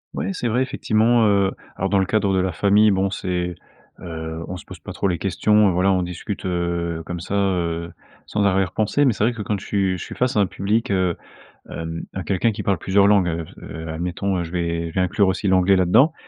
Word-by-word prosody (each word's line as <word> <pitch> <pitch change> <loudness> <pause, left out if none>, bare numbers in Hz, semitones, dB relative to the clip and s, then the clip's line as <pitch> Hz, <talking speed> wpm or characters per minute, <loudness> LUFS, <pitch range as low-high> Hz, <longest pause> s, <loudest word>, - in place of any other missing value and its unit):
Ouais, - - -2
c'est 125 - -2
vrai, 120 +3 +1
effectivement, 115 -2 +2
heu, 100 -1 +3 0.2
alors, 95 - -1
dans 100 0 +3
le 95 - +2
cadre 100 -2 +1
de 95 - +2
la 95 0 0
famille, 105 +5 +4
bon, 95 -1 +1
c'est, 90 -2 -2 0.5
heu, 80 -1 -6
on 90 - -5
se - - -12
pose - - -11
pas - - -9
trop - - -1
les 85 -3 -1
questions, 105 +3 +3
heu, - - +1
voilà, 90 +2 +2
on 95 -1 +2
discute, 90 +3 -5
heu, 85 -2 -2
comme 90 -1 -5
ça, 90 +4 -4
heu, 85 -4 -1 0.3
sans 105 - -1
arrière 95 -2 +2
pensée, 110 +9 +1
mais 130 - +3
c'est 105 - -2
vrai 120 +2 +2
que 110 -3 -5
quand 105 -1 -2
je 100 - -11
suis 95 -2 0
je - - -5
suis - - -8
face 125 0 0
à - - +3
un 100 - +3
public, 110 +7 -1
heu, 95 -3 +1 0.6
hem, 80 0 -5
à 95 - -4
quelqu'un 100 +5 +1
qui 105 0 -5
parle 100 -1 +1
plusieurs 100 +2 +3
langues, 100 -4 +4
heu, 85 0 -3
f - - -17
heu, 80 +1 -7
admettons, 90 +4 -2
heu, 90 - -1
je 85 - -8
vais 85 -1 -2
je - - -11
vais 95 - +1
inclure 95 +2 +2
aussi 95 +2 -1
l'anglais 95 +1 +4
là-dedans. 95 - +4
95 Hz, 245 wpm, -22 LUFS, 85-105 Hz, 0.6 s, famille